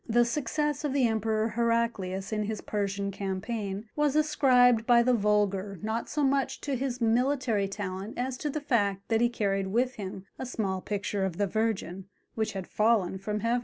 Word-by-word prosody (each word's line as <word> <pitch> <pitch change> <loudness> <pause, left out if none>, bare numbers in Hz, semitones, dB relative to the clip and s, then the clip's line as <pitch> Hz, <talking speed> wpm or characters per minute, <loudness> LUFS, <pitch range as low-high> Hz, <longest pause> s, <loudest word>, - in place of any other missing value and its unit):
The 240 +1 +4
success 295 +4 -1
of 290 -3 -1
the 275 -3 +3
Emperor 220 0 +1
Heraclius 225 -4 -1
in 210 -1 0
his 215 0 -3
Persian 200 -1 -2
campaign 200 +1 -4
was 295 -1 +1
ascribed 250 -6 +4
by 240 -1 +6
the 250 +1 +3
vulgar 205 -2 +1
not 220 +2 -2
so 295 -1 0
much 270 0 +1
to 280 -2 -2
his 255 -1 -2
military 235 -2 +2
talent 195 +1 -5
as 255 +1 -2
to 300 - -3
the 300 +1 -3
fact 205 -8 0
that 225 0 +2
he 240 - +4
carried 195 -4 -1
with 245 +5 0
him 190 -2 -6
a - - -3
small 195 -6 -2
picture 200 0 -2
of 185 -3 -2
the 205 - +2
Virgin, 195 -3 -2 0.3
which 220 -1 -2
had 190 -2 -4
fallen 210 -4 +1
from 210 +2 -3
heaven! 235 +2 +1
220 Hz, 185 wpm, -28 LUFS, 200-245 Hz, 0.3 s, by